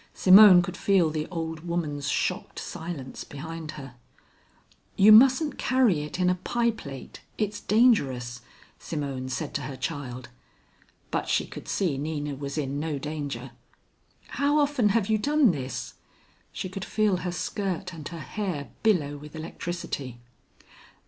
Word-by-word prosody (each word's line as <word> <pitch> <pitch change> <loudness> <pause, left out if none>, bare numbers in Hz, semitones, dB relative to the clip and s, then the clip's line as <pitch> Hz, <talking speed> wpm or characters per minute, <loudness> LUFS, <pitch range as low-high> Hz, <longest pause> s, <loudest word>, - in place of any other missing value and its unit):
Simone 190 -1 +8
could - - -5
feel 185 -5 +2
the 155 0 -3
old 160 -2 -4
woman's 155 -4 -3
shocked 180 +4 -2
silence 165 -6 -6
behind 160 +2 -7
her. 135 -4 -9 1.0
"You 205 +2 +7
mustn't 265 +7 +6
carry 245 - +3
it 150 +4 -6
in 180 - +2
a 180 - +4
pie 235 -1 +1
plate, 140 - -10 0.2
it's 210 -1 -2
dangerous," 135 - +2 0.4
Simone 140 -4 -4
said 140 +3 -4
to 145 - -2
her 135 0 -6
child, 130 -3 -5 0.8
but - - -2
she - - +2
could - - -10
see 165 -9 0
Nina 150 -1 -3
was 140 +2 -6
in 140 -1 -2
no 155 -1 -2
danger. 150 0 -5 0.8
"How 285 +1 +1
often 285 -7 +2
have 210 -1 +1
you 220 -1 +2
done 290 -1 +4
this?" 130 -5 -5 0.6
She - - -5
could 185 +1 -6
feel 210 -3 +1
her 180 0 -3
skirt 185 0 -3
and 155 -3 -7
her 170 -2 -7
hair 160 -1 -4
billow 155 -10 +2
with 150 +2 -11
electricity. 155 -5 -5
165 Hz, 145 wpm, -26 LUFS, 145-200 Hz, 1.0 s, Simone